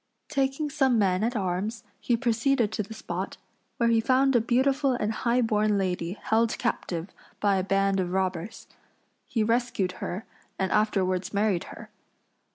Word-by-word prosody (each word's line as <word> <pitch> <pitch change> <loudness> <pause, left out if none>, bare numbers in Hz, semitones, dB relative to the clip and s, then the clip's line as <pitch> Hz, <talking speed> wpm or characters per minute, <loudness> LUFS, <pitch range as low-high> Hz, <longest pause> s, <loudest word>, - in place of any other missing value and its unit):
Taking 275 +1 0
some 270 -5 +3
men 190 -2 +2
at 240 +2 0
arms 200 +3 -2 0.2
he 240 - +1
proceeded 235 -1 +1
to 215 - -2
the 205 - -8
spot, - - -5 0.4
where 235 -2 +2
he 230 -1 +4
found 260 +2 +3
a 240 - +5
beautiful 265 +4 +2
and 215 -3 -1
high 235 +3 +1
born 215 -2 +2
lady 180 -2 -1
held 225 +2 0
captive 185 -6 -2 0.3
by 200 -2 +2
a 185 - 0
band 195 0 +1
of 180 -1 -1
robbers. 185 +1 -2 0.6
He 225 - 0
rescued 230 -4 0
her 190 +5 -4 0.3
and 190 -1 -1
afterwards 195 -3 +1
married 200 -4 +1
her. - - -11
215 Hz, 160 wpm, -27 LUFS, 190-240 Hz, 0.6 s, a